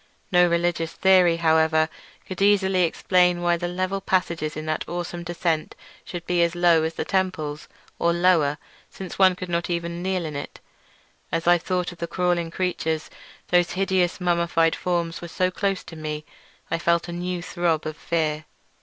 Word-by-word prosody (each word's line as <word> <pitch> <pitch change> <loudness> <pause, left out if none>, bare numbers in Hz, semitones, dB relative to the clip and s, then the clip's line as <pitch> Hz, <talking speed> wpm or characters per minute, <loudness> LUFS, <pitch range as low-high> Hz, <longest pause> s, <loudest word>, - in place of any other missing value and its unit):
No 180 -1 +5
religious 170 -1 0
theory, 185 -3 +4
however, 160 -1 +3 0.4
could 185 0 -7
easily 190 -3 +4
explain 180 +1 +2
why 175 0 +3
the 175 +1 -3
level 185 +2 -2
passage 180 -3 0
in 155 0 -4
that 155 0 -1
awesome 175 0 -4
descent 170 -2 -2 0.3
should 175 -2 -7
be 175 0 +1
as 170 0 +1
low 175 -2 +4
as 160 +1 -2
the - - -3
temples—or 170 -3 -2
lower, 170 -4 +3 0.3
since 190 -1 -9
one 190 -1 +6
could 185 0 -6
not 170 0 -2
even 170 0 -3
kneel 185 -2 -1
in 155 -2 -5
it. 140 - -7 0.7
As 165 - -1
I 175 0 +5
thought 180 +1 -2
of 175 - -14
the 170 - -3
crawling 175 -1 0
creatures, 165 -3 -2 0.4
whose 175 -1 +3
hideous 190 -2 +1
mummified 170 -2 +2
forms 170 -2 -2
were 170 - -6
so 185 +2 0
close 195 0 -1
to 165 - -11
me, 155 -1 -5 0.5
I 165 - 0
felt 170 0 +1
a - - -5
new 175 0 -3
throb 170 -3 -1
of 155 0 -4
fear. 155 -2 -1
175 Hz, 170 wpm, -24 LUFS, 165-180 Hz, 0.7 s, one